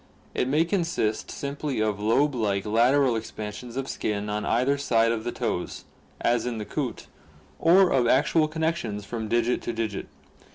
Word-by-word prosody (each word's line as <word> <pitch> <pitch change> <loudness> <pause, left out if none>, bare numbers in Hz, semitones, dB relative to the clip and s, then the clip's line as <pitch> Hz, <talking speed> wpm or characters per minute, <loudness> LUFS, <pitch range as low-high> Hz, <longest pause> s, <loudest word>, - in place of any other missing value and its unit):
It - - 0
may 150 +5 +3
consist 170 - -1
simply 140 -2 -3
of 105 -2 0
lobe 135 +8 +2
like 100 -5 0
lateral 120 +4 +3
expansions 110 +2 -6
of 135 0 -2
skin 105 0 -2
on 105 0 -2
either 130 +4 +2
side 115 -5 +2
of 110 -1 -2
the 120 - -2
toes, - - -3 0.3
as 120 0 +1
in 120 -2 -2
the 105 - -4
coot, - - -4 0.5
or 180 +2 +5
of 125 -3 +3
actual 155 +5 +3
connections 155 -10 -2
from 110 0 -4
digit 120 +2 +1
to 120 - -3
dipt. 110 -3 -3
120 Hz, 165 wpm, -26 LUFS, 110-140 Hz, 0.5 s, or